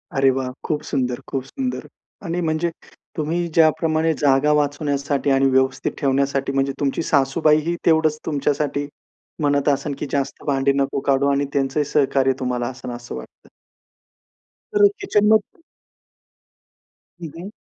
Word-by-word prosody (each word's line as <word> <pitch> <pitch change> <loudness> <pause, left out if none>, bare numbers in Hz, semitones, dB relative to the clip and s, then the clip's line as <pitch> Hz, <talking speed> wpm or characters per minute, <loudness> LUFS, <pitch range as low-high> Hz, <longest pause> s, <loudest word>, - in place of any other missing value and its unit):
अरे 135 0 +4
वाह! 130 -1 -3
खूप 150 -2 -1
सुंदर, 125 -3 -1
खूप 135 -2 -3
सुंदर. 260 - -4 0.4
आणि 170 +1 -2
म्हणजे 160 +1 0 0.5
तुम्ही 165 +3 -1
ज्याप्रमाणे 160 0 +3
जागा 140 +1 +3
वाचवण्यासाठी 145 -1 0
आणि 135 0 +3
व्यवस्थित 130 0 +1
ठेवण्यासाठी 135 0 +1
म्हणजे 135 0 0
तुमची 140 -2 0
सासूबाईही 155 +4 +2
तेवढंच 160 -2 +3
तुमच्यासाठी 145 -1 -1 0.5
म्हणत 145 -1 +1
असेन 145 +1 0
की - - -2
जास्त 140 -1 -2
भांडी 140 -1 +2
नको 140 0 0
काढू 140 0 +3
आणि 140 +1 +1
त्यांचंही 140 +1 0
सहकार्य 135 -2 +2
तुम्हाला 125 -2 -2
असेन 125 -1 -7
असं 120 0 -7
वाटतं. - - -12 1.2
तर 415 0 +6
किचनमध्ये. 215 - +2 1.6
हं, 165 - -5
हं. 180 +4 -7
145 Hz, 130 wpm, -21 LUFS, 135-155 Hz, 1.6 s, तर